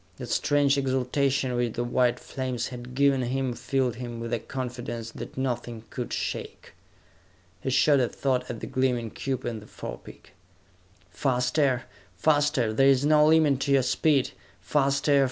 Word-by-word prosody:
That -, -, -7 dB
strange 145 Hz, -1 st, +2 dB
exaltation 130 Hz, 0 st, 0 dB
which 120 Hz, -2 st, 0 dB
the 120 Hz, -, -2 dB
white 120 Hz, 0 st, +1 dB
flames 130 Hz, -3 st, -4 dB
had 125 Hz, 0 st, -9 dB
given 140 Hz, -1 st, +3 dB
him 130 Hz, +1 st, -1 dB
filled 120 Hz, 0 st, -1 dB
him 120 Hz, -2 st, -6 dB
with 115 Hz, +1 st, -4 dB
a 120 Hz, -, +1 dB
confidence 120 Hz, -3 st, -5 dB
that -, -, -9 dB
nothing 120 Hz, -3 st, -3 dB
could 125 Hz, -2 st, -5 dB
shake. -, -, -5 dB, 0.9 s
He -, -, -2 dB
shot 140 Hz, +2 st, +4 dB
a 125 Hz, -, +1 dB
thought 130 Hz, -2 st, -1 dB
at 115 Hz, -2 st, -5 dB
the -, -, -4 dB
gleaming 125 Hz, -4 st, 0 dB
cube 130 Hz, -2 st, -3 dB
in 115 Hz, -2 st, -3 dB
the 105 Hz, -, -14 dB
forepeak. -, -, -10 dB, 0.8 s
"Faster! 125 Hz, 0 st, +1 dB, 0.3 s
Faster! 145 Hz, -, +2 dB
There 135 Hz, +4 st, +4 dB
is 135 Hz, 0 st, +4 dB
no 150 Hz, 0 st, +5 dB
limit 155 Hz, -4 st, +4 dB
to 140 Hz, 0 st, +1 dB
your 135 Hz, -1 st, +4 dB
speed! 135 Hz, +1 st, +2 dB, 0.3 s
Faster! 140 Hz, +6 st, +2 dB
130 Hz, 155 wpm, -27 LUFS, 120-140 Hz, 0.9 s, no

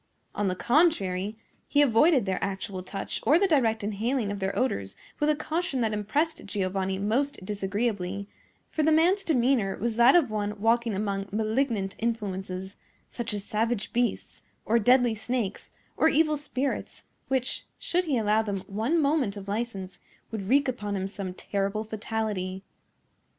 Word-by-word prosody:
On 205 Hz, -, 0 dB
the 185 Hz, -, 0 dB
contrary, 215 Hz, -, +2 dB, 0.3 s
he 285 Hz, -, +2 dB
avoided 270 Hz, -, +4 dB
their 190 Hz, -1 st, -1 dB
actual 195 Hz, -1 st, -3 dB
touch 195 Hz, +2 st, -5 dB
or 305 Hz, -, +5 dB
the 395 Hz, -, +3 dB
direct 230 Hz, -, +2 dB
inhaling 215 Hz, +2 st, -1 dB
of 200 Hz, -, -4 dB
their 190 Hz, 0 st, -2 dB
odors 100 Hz, -, -1 dB, 0.2 s
with 295 Hz, -, +2 dB
a 305 Hz, -, +4 dB
caution 310 Hz, -2 st, -2 dB
that 220 Hz, -2 st, +1 dB
impressed 295 Hz, +11 st, -1 dB
Giovanni 190 Hz, -1 st, -1 dB
most 230 Hz, +4 st, -1 dB
disagreeably; 200 Hz, -1 st, -2 dB, 0.4 s
for 315 Hz, -, 0 dB
the 310 Hz, +1 st, +3 dB
man's 350 Hz, +6 st, +4 dB
demeanor 250 Hz, -, +2 dB
was 230 Hz, +2 st, -2 dB
that 240 Hz, +5 st, +7 dB
of 300 Hz, -10 st, +4 dB
one 210 Hz, -1 st, -2 dB
walking 230 Hz, 0 st, +2 dB
among 200 Hz, -1 st, -2 dB
malignant 220 Hz, -2 st, 0 dB
influences, 195 Hz, -4 st, -3 dB, 0.3 s
such 235 Hz, -2 st, -3 dB
as 205 Hz, -1 st, -3 dB
savage 225 Hz, +1 st, -1 dB
beasts, 240 Hz, 0 st, -1 dB, 0.2 s
or 230 Hz, +2 st, +3 dB
deadly 245 Hz, +1 st, +4 dB
snakes, 220 Hz, -2 st, -3 dB, 0.3 s
or 320 Hz, -, +4 dB
evil 310 Hz, 0 st, +3 dB
spirits, 280 Hz, -2 st, -3 dB, 0.2 s
which, 260 Hz, -1 st, -1 dB
should 360 Hz, +1 st, 0 dB
he 285 Hz, -6 st, +1 dB
allow 215 Hz, 0 st, +3 dB
them 200 Hz, -3 st, -3 dB
one 225 Hz, -, 0 dB
moment 280 Hz, -9 st, +1 dB
of 200 Hz, 0 st, -8 dB
license, 200 Hz, -4 st, -4 dB, 0.3 s
would 205 Hz, -3 st, -4 dB
wreak 275 Hz, +2 st, +4 dB
upon 210 Hz, -5 st, -2 dB
him 190 Hz, 0 st, -2 dB
some 195 Hz, -1 st, -5 dB
terrible 200 Hz, +3 st, -2 dB
fatality. 210 Hz, -4 st, -3 dB
220 Hz, 155 wpm, -27 LUFS, 200-265 Hz, 0.4 s, that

